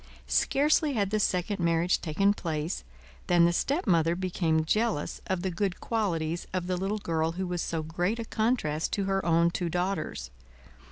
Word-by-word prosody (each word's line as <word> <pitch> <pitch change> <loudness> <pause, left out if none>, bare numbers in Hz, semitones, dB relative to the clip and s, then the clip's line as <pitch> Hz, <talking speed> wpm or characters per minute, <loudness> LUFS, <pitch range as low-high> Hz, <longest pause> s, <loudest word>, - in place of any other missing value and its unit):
Scarcely 295 +1 +2
had 205 -5 0
the 215 - +1
second 195 +1 0
marriage 170 +1 +2
taken 195 +5 +2
place, 160 -2 -3 0.4
than 175 -2 +5
the 170 - +3
stepmother 170 - +2
became 170 -3 0
jealous 215 -2 0
of 190 -2 -1
the 190 - -1
good 180 +1 -2
qualities 170 -7 -1
of 180 -1 -1
the 185 0 -1
little 195 +4 -1
girl 165 -4 -1
who 185 +2 -3
was 175 -1 -2
so 165 -1 -2
great 175 +7 -1
a 230 - -4
contrast 215 -10 0
to 200 - 0
her 195 0 0
own 170 0 +3
two 175 0 -2
daughters. 175 - -2
180 Hz, 170 wpm, -28 LUFS, 165-200 Hz, 0.4 s, than